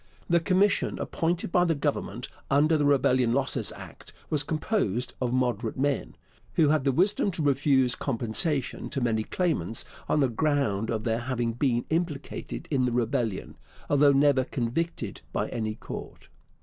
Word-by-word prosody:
The 170 Hz, 0 st, +4 dB
commission 195 Hz, +3 st, +2 dB
appointed 170 Hz, +1 st, -2 dB
by 175 Hz, -, +4 dB
the 165 Hz, -2 st, +2 dB
Government 140 Hz, -5 st, -2 dB, 0.2 s
under 150 Hz, +3 st, +4 dB
the 150 Hz, -2 st, +2 dB
Rebellion 130 Hz, -4 st, +3 dB
Losses 135 Hz, +1 st, 0 dB
Act -, -, -12 dB, 0.2 s
was 150 Hz, -2 st, +2 dB
composed 145 Hz, -, -1 dB
of 125 Hz, -2 st, 0 dB
moderate 120 Hz, -3 st, 0 dB
men, 135 Hz, -, -1 dB, 0.4 s
who 155 Hz, -3 st, +4 dB
had 150 Hz, -3 st, +2 dB
the 135 Hz, -, +4 dB
wisdom 195 Hz, +8 st, +2 dB
to 165 Hz, -4 st, -3 dB
refuse 135 Hz, -2 st, +3 dB
compensation 130 Hz, +3 st, -1 dB
to 140 Hz, -, -2 dB
many 115 Hz, -3 st, +1 dB
claimants 130 Hz, -, -1 dB, 0.2 s
on 150 Hz, -, +3 dB
the 135 Hz, -, +4 dB
ground 120 Hz, -5 st, 0 dB
of 110 Hz, -2 st, -2 dB
their 115 Hz, 0 st, 0 dB
having 120 Hz, -1 st, -2 dB
been 120 Hz, -1 st, 0 dB
implicated 160 Hz, 0 st, -3 dB
in 130 Hz, -3 st, +2 dB
the 125 Hz, -, 0 dB
rebellion, 120 Hz, -3 st, -1 dB, 0.3 s
although 145 Hz, 0 st, +6 dB
never 140 Hz, -1 st, +4 dB
convicted 125 Hz, -, -3 dB
by -, -, -1 dB
any 110 Hz, -2 st, -3 dB
court. -, -, -9 dB
135 Hz, 155 wpm, -27 LUFS, 120-155 Hz, 0.4 s, although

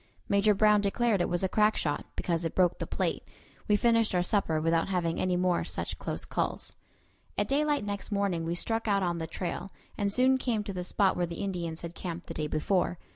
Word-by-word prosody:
Major 200 Hz, +1 st, +3 dB
Brown 210 Hz, 0 st, +5 dB
declared 205 Hz, 0 st, +1 dB
it -, -, 0 dB
was 175 Hz, +1 st, 0 dB
a -, -, +3 dB
crack 210 Hz, +3 st, +3 dB
shot, 145 Hz, -2 st, -1 dB
because 170 Hz, -1 st, -1 dB
it 165 Hz, -, -3 dB
broke 180 Hz, -2 st, +3 dB
the -, -, -3 dB
plate. -, -, -1 dB, 0.5 s
We 210 Hz, -, +4 dB
finished 230 Hz, -1 st, +3 dB
our 175 Hz, -, +3 dB
supper 180 Hz, -5 st, +1 dB
without 165 Hz, +2 st, +1 dB
having 170 Hz, -3 st, 0 dB
any 180 Hz, -1 st, +1 dB
more 180 Hz, -1 st, +1 dB
such -, -, -3 dB
close -, -, -2 dB
calls. -, -, -2 dB, 0.6 s
At -, -, +1 dB
daylight 290 Hz, -3 st, +1 dB
next 205 Hz, +1 st, -4 dB
morning 200 Hz, -5 st, 0 dB
we 165 Hz, +1 st, -2 dB
struck 225 Hz, +5 st, -2 dB
out 200 Hz, -2 st, +2 dB
on 175 Hz, -1 st, -1 dB
the 160 Hz, -, -3 dB
trail, 180 Hz, +3 st, -4 dB, 0.3 s
and 200 Hz, -1 st, +1 dB
soon 260 Hz, +4 st, +4 dB
came 230 Hz, -5 st, -1 dB
to 200 Hz, -1 st, -5 dB
the 180 Hz, -1 st, -3 dB
spot 190 Hz, +2 st, +2 dB
where 175 Hz, -1 st, 0 dB
the 170 Hz, +4 st, -5 dB
Indians 175 Hz, -4 st, -3 dB
had 170 Hz, 0 st, -6 dB
camped 175 Hz, -2 st, -6 dB
the -, -, -7 dB
day 150 Hz, -, -2 dB
before. 175 Hz, +4 st, 0 dB
190 Hz, 220 wpm, -29 LUFS, 170-210 Hz, 0.6 s, Brown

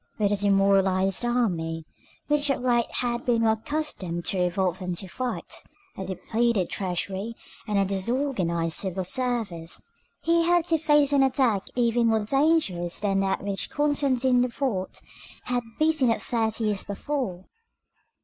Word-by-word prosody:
With 205 Hz, -2 st, +1 dB
a -, -, +3 dB
demoralized 195 Hz, -1 st, +3 dB
army, 170 Hz, -10 st, 0 dB, 0.4 s
which 295 Hz, -1 st, +1 dB
of 270 Hz, -2 st, 0 dB
late 240 Hz, -2 st, +2 dB
had 240 Hz, -1 st, -1 dB
been 235 Hz, -2 st, +2 dB
more 220 Hz, -, +4 dB
accustomed 220 Hz, -, -3 dB
to 190 Hz, -, 0 dB
revolt 180 Hz, 0 st, 0 dB
than 180 Hz, -2 st, -3 dB
to 190 Hz, -, -5 dB
fight, 250 Hz, +7 st, -4 dB, 0.3 s
a -, -, -5 dB
depleted 220 Hz, +1 st, 0 dB
treasury, 195 Hz, +4 st, -3 dB, 0.3 s
and 210 Hz, -1 st, 0 dB
a 195 Hz, -, +3 dB
disorganized 190 Hz, -, 0 dB
civil 190 Hz, -1 st, -2 dB
service, 210 Hz, -7 st, -2 dB, 0.4 s
he 335 Hz, 0 st, +3 dB
had 345 Hz, -1 st, +3 dB
to 325 Hz, -1 st, +3 dB
face 295 Hz, -2 st, +3 dB
an 280 Hz, -, +5 dB
attack 255 Hz, -7 st, +2 dB
even 235 Hz, -1 st, +2 dB
more 220 Hz, -2 st, +2 dB
dangerous 270 Hz, -, +1 dB
than 195 Hz, -2 st, +1 dB
that 195 Hz, 0 st, 0 dB
which 200 Hz, -2 st, -2 dB
Constantine 270 Hz, -4 st, +2 dB
IV. 250 Hz, +1 st, -4 dB, 0.8 s
had 245 Hz, 0 st, 0 dB, 0.2 s
beaten 310 Hz, -5 st, +3 dB
off 230 Hz, -, 0 dB
thirty 225 Hz, -1 st, 0 dB
years 210 Hz, -3 st, 0 dB
before. 205 Hz, -3 st, -4 dB
220 Hz, 145 wpm, -26 LUFS, 190-255 Hz, 0.8 s, an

